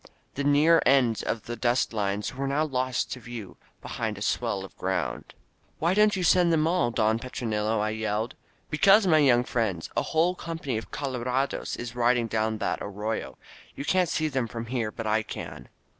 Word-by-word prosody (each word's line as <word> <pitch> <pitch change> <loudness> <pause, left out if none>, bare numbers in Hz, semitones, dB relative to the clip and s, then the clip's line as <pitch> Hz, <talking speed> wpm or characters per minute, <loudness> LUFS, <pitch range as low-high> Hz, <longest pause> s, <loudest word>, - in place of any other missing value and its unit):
The 140 - -3
near 150 +4 +5
ends 125 -4 +3
of 115 - -3
the 120 - -5
dust 120 +1 +1
lines 105 -1 -1
were 135 +2 -3
now 145 +3 +1
lost 130 -3 -1
to 130 - -4
view 120 -4 -9 0.3
behind - - -3
a - - -4
swell 95 -1 -1
of - - -15
groimd. 95 +1 -2 0.5
"Why 170 +3 +1
don't 210 +1 +4
you 185 - -2
send 175 0 +4
them 155 -1 +3
all, 165 -8 +2
Don 110 -1 +1
Petronilo?" 110 -3 -2
I 105 +1 0
yelled. 110 +2 -2 0.4
^^Because, 195 +7 +6
my 160 -4 +5
young 125 -4 +5
friend, 110 -9 -1
a - - +2
whole 170 +3 +1
company 165 -9 -4
of 110 - -11
colorados 130 0 -2
is 120 -1 -7
riding 120 0 +2
down 110 0 -1
that - - -2
arroyo. 105 +2 -4 0.4
You 140 - -5
can't 185 -1 +2
see 155 - 0
them 135 -5 -1
from 115 0 -6
there, 115 -2 -2
but 115 - -6
I 110 +1 +2
can." - - -8
120 Hz, 190 wpm, -27 LUFS, 110-150 Hz, 0.5 s, ^^Because